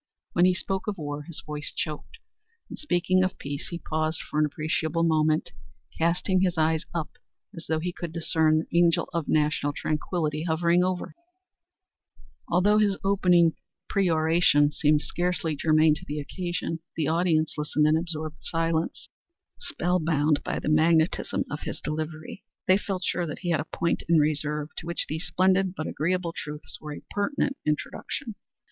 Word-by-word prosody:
When 175 - +5
he 185 0 +4
spoke 190 +2 -3
of 205 -2 -2
war 145 -2 -4
his 170 - -7
voice 150 -1 -4
choked; 155 - -5 0.5
in - - -6
speaking 185 - +1
of 185 - -1
peace 140 0 -5
he 170 - -5
paused 155 -1 -1
for 150 - -3
an 155 - +4
appreciable 160 +2 -1
moment, 155 -1 +2 0.4
casting 180 +3 +1
his 180 -3 +1
eyes 160 0 +1
up 160 -3 -3 0.4
as 165 - -9
though 160 - +1
he 175 +2 -3
could 170 -2 -6
discern 160 -1 +2
the - - +1
angel 170 -2 +3
of 170 -3 -1
national 150 -1 +1
tranquillity 155 0 -2
hovering 170 +2 +3
overhead. 185 -1 -2 1.3
Although 200 +5 +4
this 200 -2 +2
opening 180 -4 +4 0.4
peroration 160 -5 +3
seemed 150 0 +3
scarcely 175 -3 -1
germane 155 +1 +4
to 150 - -7
the 150 +1 -3
occasion, 170 +1 -3 0.2
the 155 -3 0
audience 160 -1 +2
listened 150 0 +1
in 155 +1 +4
absorbed 160 -2 -3
silence, 165 0 -1 0.5
spell 180 +1 0
bound 155 -2 +2
by - - -2
the - - -4
magnetism 160 +1 +3
of - - -3
his - - -5
delivery. 155 +3 -5 0.2
They 185 +1 +5
felt 190 -3 -3
sure 175 -2 0
that 150 - -6
he 175 - +1
had 160 - +2
a - - -2
point 170 - -1
in 170 - +6
reserve 150 0 0
to 165 - -6
which 170 - -1
these 160 +3 -3
splendid 190 0 +2
and 155 - -3
agreeable 170 +2 -1
truths 150 0 -7
were 150 - -7
a - - -11
pertinent 275 +6 0
introduction. 220 - -3
165 Hz, 165 wpm, -26 LUFS, 155-180 Hz, 1.3 s, in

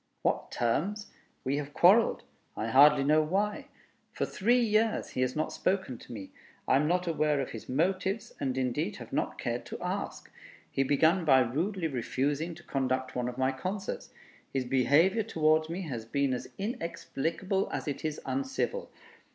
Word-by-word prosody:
"What - - 0
terms? 190 - -1 0.3
We 135 +2 0
have 145 0 -5
quarreled. 205 +6 +5 0.3
I 110 - -2
hardly 140 +3 +7
know 155 +2 +4
why. 195 +7 -1 0.4
For - - -1
three 240 +6 +2
years 220 -1 +2
he 130 - -3
has 130 0 0
not 155 - -1
spoken 185 -11 -1
to - - -13
me. 100 -5 -7 0.4
I - - +4
am 150 +2 +2
not 180 +2 +1
aware 155 -3 +1
of 135 - -3
his 115 - -9
motives, 190 - 0
and 130 -2 -1
indeed 130 -2 -1
have - - -10
not - - -1
cared - - -2
to - - -6
ask. - - -4 0.4
He - - 0
began 160 +6 +3
by 135 -4 +6
rudely 165 - -1
refusing 145 +5 -1
to 175 - -14
conduct 130 -2 -1
one 125 -1 -1
of 125 - -8
my 130 0 +2
concerts. 185 +9 -4 0.4
His 135 -2 -1
behavior 145 - +3
towards 155 -6 +2
me 180 +3 -3
has 125 -9 -5
been 140 +3 0
as 125 - -4
inexplicable 190 - -2
as - - -4
it 145 - -3
is 155 -1 -2
uncivil. 275 - -2
155 Hz, 170 wpm, -30 LUFS, 130-190 Hz, 0.4 s, hardly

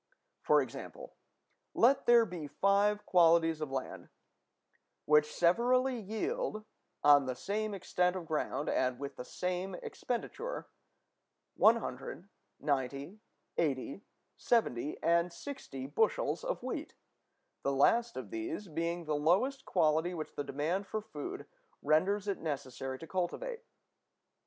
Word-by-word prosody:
For - - +4
example, - - -9 0.6
let 270 +4 +4
there 235 -1 +7
be 175 -6 -6
five 200 +5 +2
qualities 165 -2 +4
of 155 - -2
land, 135 -1 -5 1.0
which 150 0 +4
severally 245 +8 +3
yield, 220 - -3 0.4
on 145 -2 +6
the 130 - -2
same 205 +9 -2
extent 180 -1 0
of 180 -3 -5
ground 155 -2 -2
and 130 -1 +1
with 140 +1 -6
the - - -6
same 180 +6 -3
expenditure, 425 - -4 0.9
100, 195 - +1 0.3
90, 140 +6 -2 0.4
80, 140 +1 -1 0.4
70, 150 - 0
and 170 +1 +3
60 170 - -7
bushels 220 - 0
of - - -3
wheat, - - -4 0.7
the 140 - 0
last 230 - +3
of - - -6
these 335 - -4
being 170 +2 -2
the 155 - -1
lowest 185 - +2
quality 160 +1 +2
which 155 -2 -6
the 145 - -3
demand 160 +9 -2
for 215 +1 -3
food 380 - -6 0.4
renders 195 +7 +2
it 200 - -1
necessary 135 -3 -4
to 165 - -9
cultivate. 450 - -3
180 Hz, 125 wpm, -33 LUFS, 150-220 Hz, 1.0 s, there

